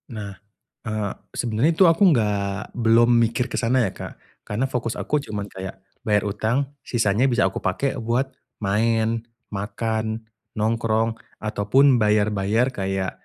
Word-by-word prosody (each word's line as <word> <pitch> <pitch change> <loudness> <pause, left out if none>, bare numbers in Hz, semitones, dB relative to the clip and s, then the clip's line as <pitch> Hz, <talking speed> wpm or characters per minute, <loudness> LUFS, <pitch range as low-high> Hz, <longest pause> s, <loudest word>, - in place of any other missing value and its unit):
Nah, 100 -2 -5 0.5
eee, 110 -3 -2 0.2
sebenernya 120 +7 +1
itu 175 +4 +4
aku 165 +4 +4
enggak 100 -5 -1
belum 115 0 +4 0.2
mikir 115 +2 0
ke - - -6
sana 125 -1 +2
ya - - -5
Kak - - -7 0.3
karena 110 +6 -1
fokus 120 -3 -3
aku 150 - -1
cuman 105 -1 -5
kayak 95 -1 -8 0.2
bayar 105 -1 +2
utang, 110 +5 0 0.3
sisanya 115 -1 +1
bisa 120 -5 +3
aku 95 - -4
pakai 130 +10 0
buat 120 +4 0 0.3
main, 110 +2 +1 0.3
makan, 110 +2 -3 0.3
nongkrong 115 0 +1 0.2
ataupun 115 +6 +3
bayar-bayar 105 +2 +2
kayak 95 -1 -2
110 Hz, 135 wpm, -23 LUFS, 105-120 Hz, 0.5 s, itu